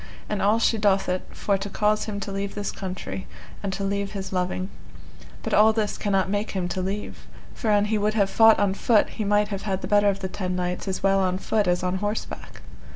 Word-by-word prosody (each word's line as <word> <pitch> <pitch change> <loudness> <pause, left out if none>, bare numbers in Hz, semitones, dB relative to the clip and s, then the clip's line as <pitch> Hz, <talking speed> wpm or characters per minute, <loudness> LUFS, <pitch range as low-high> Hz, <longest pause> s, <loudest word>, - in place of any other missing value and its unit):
And 210 -2 -2
all 210 +3 +4
she 230 -1 +2
doth 200 -2 +2
it 180 0 -2
for 200 -2 -1
to 205 +1 -4
cause 210 +2 +1
him 210 -2 -4
to 200 - -4
leave 195 0 -3
this 205 -1 -2
country, 190 0 -6 0.3
and 200 - -2
to 195 +1 -3
leave 200 +1 -2
his 190 -2 -5
loving; 185 +1 -1 0.7
but - - -3
all 220 +1 +6
this 215 -2 -1
cannot 195 -2 +1
make 205 +2 -1
him 180 -1 -1
to 185 - -2
leave, 195 +3 -5 0.3
for 225 - -3
an 205 -1 +4
he 215 0 0
would 210 +1 0
have 200 -3 +3
fought 225 +2 +6
on 200 -2 +2
foot 210 +1 +3
he 220 - -4
might 205 0 +2
have 200 -2 -4
had 195 -2 -2
the - - -2
better 205 -1 +4
of 195 0 -2
the 190 - -2
ten 185 -1 -3
knights 180 +1 -3
as 190 -1 -3
well 195 0 +4
on 185 -1 +1
foot 210 +1 0
as 175 0 +1
on 180 +1 0
horseback. 205 +3 -5
200 Hz, 235 wpm, -25 LUFS, 190-210 Hz, 0.7 s, all